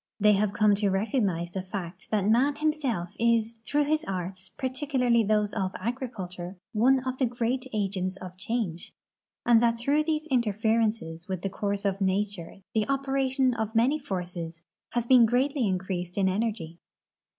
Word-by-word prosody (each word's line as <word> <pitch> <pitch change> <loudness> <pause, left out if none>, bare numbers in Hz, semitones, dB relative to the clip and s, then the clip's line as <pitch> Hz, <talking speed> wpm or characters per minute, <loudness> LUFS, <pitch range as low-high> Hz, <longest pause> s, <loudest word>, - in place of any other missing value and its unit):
The}" 210 0 +6
have 205 0 +2
come 210 0 +4
to 205 -1 +1
recognize 195 -4 0
the 190 - -3
fact 185 -1 -7
that 205 -2 +1
man 255 +6 +3
him 310 0 +1
self 235 - -3
is, 230 0 +2
through 295 0 +2
his 305 +2 +1
arts, 185 0 -5
particularly 255 -3 +1
those 210 0 +1
of 190 -3 -2
agriculture, 195 -6 -5 0.2
one 255 +4 +4
of 255 0 -3
the 260 - +3
great 245 +2 -1
agents 195 -3 -2
of 185 -1 -9
change, 200 -4 -3 0.5
and 235 -2 +6
that 235 -1 +3
through 280 +6 +2
these 310 -1 0
interferences 220 -7 0
with 185 -2 -4
the 195 - -2
course 200 0 -2
of 195 0 0
nature 195 -1 -1
the 220 +3 0
operation 270 -1 +1
of 220 -1 -3
many 260 +7 +3
foz'ces 175 - -5 0.3
has 240 -1 -1
been 240 -2 +7
greatly 255 +1 +1
increased 180 -1 -3
in 195 -1 +3
energy. 190 -5 -2
215 Hz, 160 wpm, -27 LUFS, 190-250 Hz, 0.5 s, been